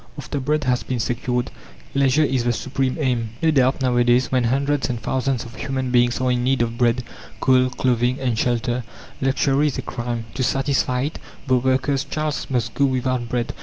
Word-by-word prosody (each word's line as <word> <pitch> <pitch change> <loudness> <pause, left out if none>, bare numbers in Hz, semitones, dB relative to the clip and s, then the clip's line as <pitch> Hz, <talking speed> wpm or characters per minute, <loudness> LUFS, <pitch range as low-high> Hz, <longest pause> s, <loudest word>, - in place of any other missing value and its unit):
After 145 0 -4
bread 150 +3 0
has 125 -1 +1
been 125 -2 -3
secured, 125 +1 -1 0.4
leisure 140 +2 +3
is 130 -4 +1
the 120 0 +1
supreme 135 +1 -2
aim. 120 -6 -1
No 160 - +4
doubt, 135 -1 +2
nowadays, 120 0 +3
when 125 -2 +2
hundreds 140 +3 +1
and 120 -2 -2
thousands 130 0 -1
of 120 - -10
human 130 -2 -2
beings 120 -1 +3
are 130 0 +1
in 120 -1 0
need 130 -1 +2
of 115 0 -3
bread, 120 0 +2 0.4
coal, 130 -1 +4
clothing, 125 0 0
and 125 -3 0
shelter, 120 +1 0 0.4
luxury 135 +2 +2
is 140 - -2
a 130 - -3
crime; 120 -2 -4
to 130 - -3
satisfy 130 -1 +1
it, 145 +4 -3 0.3
the 130 -2 +3
worker's 130 +2 +1
child 155 -1 -3
must 120 -4 -1
go 140 - +2
without 130 -2 -1
bread! 120 0 -1
130 Hz, 190 wpm, -22 LUFS, 120-135 Hz, 0.4 s, No